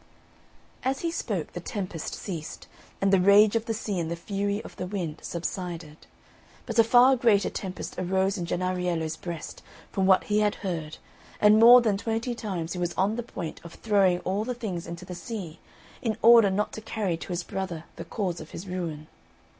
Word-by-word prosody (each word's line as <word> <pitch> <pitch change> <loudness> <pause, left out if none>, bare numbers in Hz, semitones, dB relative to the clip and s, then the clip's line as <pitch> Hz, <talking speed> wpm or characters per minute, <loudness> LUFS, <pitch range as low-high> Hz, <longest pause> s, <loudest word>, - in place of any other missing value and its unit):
As 265 +1 -1
he 335 - -1
spoke, 205 - -3
the - - -4
tempest 180 -3 -5
ceased, 165 -6 -6 0.3
and 195 0 +2
the 195 - +6
rage 200 +3 +6
of 225 0 0
the 225 - -1
sea 205 -3 -3
and 165 -1 -2
the 170 - -2
fury 200 +3 -2
of - - -11
the 180 - -4
wind 175 -5 -4
subsided. 170 -3 -5 0.6
But 230 -1 -1
a - - +9
far 245 +3 +6
greater 230 -5 +3
tempest 190 -2 -6
arose 190 +2 +1
in 175 -4 -4
Jennariello's 175 -3 -1
breast, 170 -1 -7 0.3
from 190 -1 +1
what 190 -1 +5
he 210 0 +1
had 210 -1 +2
heard, 160 -4 -3 0.4
and 210 +1 +6
more 240 +2 +9
than 215 -4 +1
twenty 225 +3 -2
times 185 -8 -4
he 180 - -5
was 175 -1 -2
on 195 +4 +1
the 240 - -2
point 175 -8 -7
of 170 0 -11
throwing 195 -5 +2
all 195 +3 -1
the 250 +2 -3
things 195 -8 -5
into 170 +2 -7
the 180 - -7
sea, 180 -5 -7 0.4
in 225 -3 -1
order 230 -2 +8
not 205 +2 -1
to 220 - -6
carry 210 -5 -2
to - - -9
his 175 0 -3
brother 180 -4 -4
the - - -7
cause 180 -6 -3
of 155 - -10
his 185 - -8
ruin. 170 -5 -4
190 Hz, 195 wpm, -27 LUFS, 175-215 Hz, 0.6 s, a